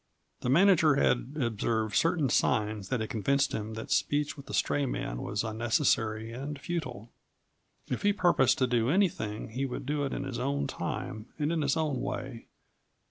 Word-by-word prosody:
The 125 - -2
manager 165 -1 +5
had 130 0 +1
observed 110 -3 -1
certain 165 -3 +3
signs 105 -3 +1
that 125 -3 0
had 110 - -3
convinced 135 +6 +1
him 110 +1 -4
that 110 - -7
speech 145 0 +1
with 140 -2 -12
the - - -7
stray 145 -1 +1
man - - -3
was 100 +1 -2
unnecessary 110 -1 0
and 140 +4 -5
futile. 130 -9 -5 0.8
If - - -3
he 205 - +4
purposed 175 - +3
to 130 - +3
do 120 -1 +1
anything 135 - 0
he 125 +5 -3
would 125 - -5
do 145 +1 -1
it 135 - -2
in - - -3
his 135 -3 -4
own 140 +2 -1
time 110 -1 -4
and 150 +1 0
in 165 -2 0
his 140 +1 +1
own 150 -5 0
way. 130 -3 -5
130 Hz, 180 wpm, -29 LUFS, 110-145 Hz, 0.8 s, manager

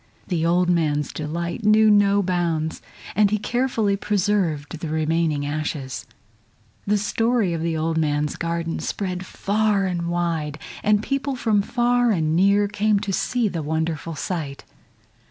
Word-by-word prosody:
The 170 -3 0
old 175 +2 +3
man's 155 -4 +1
delight 170 +6 -4
knew 215 +1 +5
no 205 -1 +4
bounds, 170 -3 -1 0.3
and 210 +1 +4
he 215 - +1
carefully 230 -2 0
preserved 185 -7 -1
the 165 - -4
remaining 155 -1 0
ashes. 145 -3 -4 0.8
The 210 +1 +3
story 225 -1 +1
of 165 - -2
the 165 -1 -1
old 160 +1 0
man's 150 -1 0
garden 170 -1 -2
spread 185 -2 -3
far 205 +1 0
and 175 -2 -2
wide, 165 -4 -1 0.2
and 210 0 +2
people 275 +1 -1
from 220 -5 +2
far 245 +2 +2
and 160 -6 +1
near 200 +3 +4
came 210 +1 +1
to 200 -1 -3
see 240 +3 0
the 175 -5 -3
wonderful 160 +1 -2
sight. 150 -5 -4
175 Hz, 145 wpm, -23 LUFS, 160-210 Hz, 0.8 s, knew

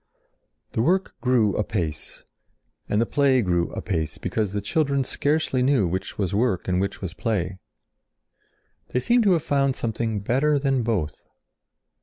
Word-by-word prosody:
The - - 0
work 185 +9 +1
grew 120 -5 +2
apace. 90 -8 -3 0.6
And 105 - +2
the 115 - +3
play 135 -2 +3
grew 85 -2 +1
apace, 80 -5 -3
because 100 +2 -2
the 105 - -2
children 140 - +1
scarcely 145 0 0
knew 130 -5 +3
which 95 +3 -4
was 100 -3 -1
work 105 -3 +1
and 90 0 +1
which 100 0 -3
was 90 -2 -4
play. 95 -3 -2 1.3
They 125 - -1
seemed 235 - +3
to 195 - +5
have 165 - +1
found 140 -2 +1
something 110 -2 -2
better 135 +8 +2
than 135 -2 +1
both. 105 -10 -2
115 Hz, 150 wpm, -24 LUFS, 95-140 Hz, 1.3 s, to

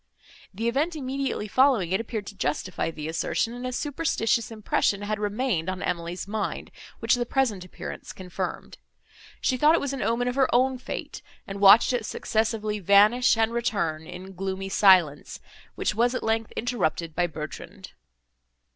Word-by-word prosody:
The 225 +4 -3
event 295 +8 0
immediately 270 -5 -3
following 245 -6 +3
it 190 +4 +1
appeared 220 -2 -5
to 205 - -9
justify 180 +1 -2
the 155 -2 -6
assertion, 165 +7 -1
and 245 +1 -5
a - - -3
superstitious 255 -5 0
impression 210 -2 0
had 210 0 -2
remained 210 -4 -1
on 185 -1 -4
Emily's 175 +1 -3
mind, 215 +1 -4 0.3
which - - +2
the 245 -2 +1
present 235 -9 0
appearance 180 - -8
confirmed. 185 -1 -6 0.6
She 255 - +1
thought 300 +5 +5
it - - +2
was 280 -1 -3
an 270 - -4
omen 235 +3 0
of 250 - 0
her 265 0 +2
own 255 +1 +2
fate, 255 - -6 0.2
and 195 0 -7
watched 205 +5 +7
it 240 -2 0
successively 215 -1 -1
vanish 205 +6 +5
and 225 +1 +1
return, 170 -9 -1
in 185 +2 -9
gloomy 190 +1 -4
silence, 185 -7 +4 0.4
which - - -1
was 240 +3 +1
at - - -3
length 225 0 0
interrupted 180 -9 -1
by 175 +2 +1
Bertrand. 175 +4 -8
215 Hz, 165 wpm, -26 LUFS, 185-245 Hz, 0.6 s, watched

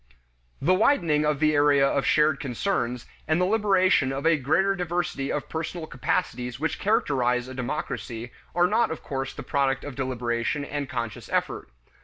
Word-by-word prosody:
The 170 +7 +3
widening 170 - +3
of 150 -2 0
the 155 0 +3
area 145 -1 +4
of 135 0 0
shared 150 -2 +3
concerns, 125 - -2 0.2
and 155 +2 +2
the 180 - +3
liberation 190 -8 +3
of 135 +3 -4
a 165 0 +5
greater 160 +8 +2
diversity 175 -6 -2
of 150 - -3
personal 160 +1 -4
capacities 125 -3 -2
which 160 0 -2
characterize 125 - +1
a 130 - -8
democracy, 120 -3 -4 0.2
are 175 0 +4
not 220 +6 +2
of 160 - -6
course 135 -1 -3
the - - -7
product 140 -1 0
of 145 - -6
deliberation 125 +1 -2
and 145 -1 -4
conscious 115 -3 -5
effort. - - -2
145 Hz, 165 wpm, -26 LUFS, 130-170 Hz, 0.2 s, a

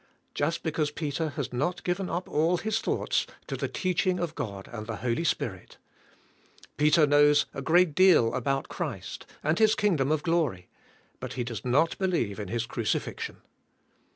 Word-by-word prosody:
Just 160 +4 -1
because 155 -2 0
Peter 155 +1 -2
has 140 -4 -3
not 145 +9 -1
given 180 +1 -1
up 175 +3 -3
all 165 +4 +2
his 220 +3 -1
thoughts - - 0 0.2
to - - -4
the - - -2
teaching 185 0 0
of 170 -2 -2
God 100 -7 -5
and 110 -2 -6
the 110 - -3
Holy 120 +6 0
Spirit. 170 - -3 1.0
Peter 150 +1 +5
knows 145 0 +5
a 135 - -5
great 170 +3 +4
deal 180 -10 +5
about 135 +2 -1
Christ - - -5 0.2
and 155 +6 +1
his 220 0 +5
kingdom 155 -9 +1
of 155 -1 +1
glory 155 - 0 0.5
but - - -6
he 125 - -2
does 120 -2 -5
not 140 +7 +2
believe 170 - 0
in 105 - -4
His 115 +3 -2
crucifixion. 115 -2 -3
150 Hz, 165 wpm, -28 LUFS, 125-175 Hz, 1.0 s, Peter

